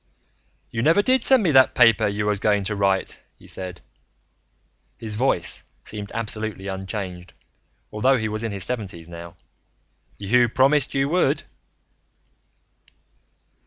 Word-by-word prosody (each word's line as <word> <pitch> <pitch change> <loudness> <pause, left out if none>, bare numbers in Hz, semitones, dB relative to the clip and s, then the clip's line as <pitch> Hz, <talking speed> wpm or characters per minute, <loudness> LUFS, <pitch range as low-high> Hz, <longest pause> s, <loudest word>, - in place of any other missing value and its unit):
"You 115 - -2
never 165 - +4
did 260 +3 +3
send 260 -4 +5
me 170 - +2
that 130 -2 +5
paper 115 -3 +5
you 105 +1 -2
was 105 -1 0
going 105 -1 +2
to 105 +2 -2
write," 100 -1 0 0.2
he - - -19
said. 90 -2 -6 1.2
His 110 -2 -6
voice 105 -6 0 0.2
seemed 105 -1 -8
absolutely 110 -3 -4
unchanged, 95 -2 -6 0.6
although 130 +5 +2
he 110 -2 -2
was 110 0 -4
in 115 -2 -3
his 100 -2 -4
seventies 95 -9 -4
now. 85 0 -10 0.8
"You 120 +4 +2
promised 135 +3 +2
you 135 0 +2
would." 180 +3 +1
105 Hz, 130 wpm, -23 LUFS, 95-125 Hz, 1.2 s, send